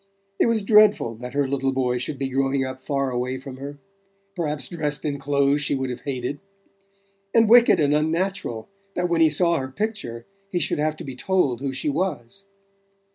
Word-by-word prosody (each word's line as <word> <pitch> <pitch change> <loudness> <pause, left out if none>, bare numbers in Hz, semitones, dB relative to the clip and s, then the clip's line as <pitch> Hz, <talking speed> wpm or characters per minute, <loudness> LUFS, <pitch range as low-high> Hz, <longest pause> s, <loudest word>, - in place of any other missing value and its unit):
It - - +4
was 225 -3 +1
dreadful 210 - +5
that 125 +2 -8
her 145 -1 +2
little 135 0 0
boy 125 -2 0
should 135 +3 -2
be 135 0 -2
growing 135 0 0
up 130 0 -6
far 140 -1 -1
away 125 +1 -2
from 130 0 -9
her, 140 +2 -7 0.6
perhaps 150 -6 -2
dressed 150 -4 -3
in 140 -2 -2
clothes 140 +1 +2
she 140 - 0
would 130 -1 -2
have 125 - -7
hated; 135 0 -4 1.0
and 225 -1 +6
wicked 240 -2 +6
and 145 -1 +3
unnatural 160 - -1 0.3
that 180 0 0
when 170 -1 +2
he 160 - +6
saw 170 +1 +2
her 130 - -4
picture 130 - -4 0.2
he 180 - -2
should 155 -3 0
have 155 +1 0
to - - -7
be 135 -2 -7
told 140 -6 0
who 140 -1 -2
she 135 +3 -3
was. 155 +2 -3
140 Hz, 190 wpm, -23 LUFS, 130-170 Hz, 1.0 s, and